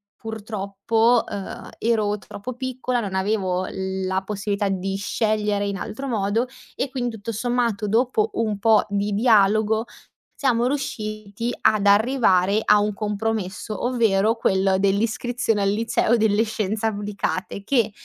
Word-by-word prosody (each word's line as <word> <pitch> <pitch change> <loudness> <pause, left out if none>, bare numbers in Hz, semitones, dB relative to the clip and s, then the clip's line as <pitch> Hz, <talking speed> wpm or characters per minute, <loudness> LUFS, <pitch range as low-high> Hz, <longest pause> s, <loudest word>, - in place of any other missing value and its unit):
purtroppo, 220 +2 0
uhm, 200 -2 -6
ero 215 -2 +1
troppo 225 +5 -8
piccola, 255 -1 -2
non 195 -3 -4
avevo 190 -2 0
la 190 0 -2
possibilità 200 0 -2
di 195 0 -2
scegliere 210 0 0
in 200 - -2
altro 225 +8 -5
modo 225 +1 0 0.3
e 265 - -2
quindi, 245 -3 -2
tutto 225 +3 -5
sommato, 235 -2 0
dopo 230 0 +2
un 215 -3 0
po' 220 0 +4
di 205 0 -1
dialogo, 220 0 +3 0.5
siamo 245 -3 +1
riusciti 215 -4 -3
ad 210 -2 +3
arrivare 205 -2 +4
a 210 0 +5
un 210 0 0
compromesso, 210 -1 -3
ovvero 225 -3 +2
quello 190 -3 +2
dell'iscrizione 220 +2 0
al 195 - +2
liceo 225 +2 +1
delle 220 -1 +3
scienze 215 0 -2
applicate, 205 -2 -3
che 230 -5 +2
215 Hz, 130 wpm, -23 LUFS, 200-230 Hz, 0.5 s, a